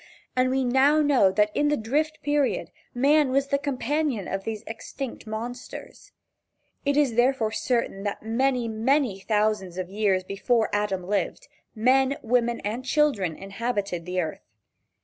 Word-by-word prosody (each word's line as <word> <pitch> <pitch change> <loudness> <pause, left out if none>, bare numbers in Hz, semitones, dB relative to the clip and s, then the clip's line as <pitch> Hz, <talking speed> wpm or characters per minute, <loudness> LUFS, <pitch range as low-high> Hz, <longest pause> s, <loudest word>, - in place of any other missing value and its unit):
And 255 0 +3
we 265 +1 +1
now 270 +5 +4
know 265 -10 +4
that 210 +1 +1
in 295 - +2
the 295 0 +2
Drift 300 +7 -1
Period 290 -2 0 0.2
man 285 +3 +3
was 275 +1 +1
the 280 - +1
companion 280 - -1
of 195 0 -4
these 220 -1 -4
extinct 230 +2 -7
monsters. 235 +4 -7 0.7
It 285 0 +1
is 285 -5 +3
therefore 240 -2 +2
certain 235 -4 -1
that 205 0 -4
many, 245 +2 +1
many 230 -1 +1
thousands 210 -3 0
of 185 0 -4
years 200 -2 +1
before 220 +4 0
Adam 205 -3 0
lived, 205 - -2 0.3
men, 260 +4 +3
women 235 0 +1
and 220 +5 -3
children 255 - +1
inhabited 195 -3 -3
the 180 0 -1
earth. 160 -9 -4
235 Hz, 150 wpm, -25 LUFS, 205-275 Hz, 0.7 s, now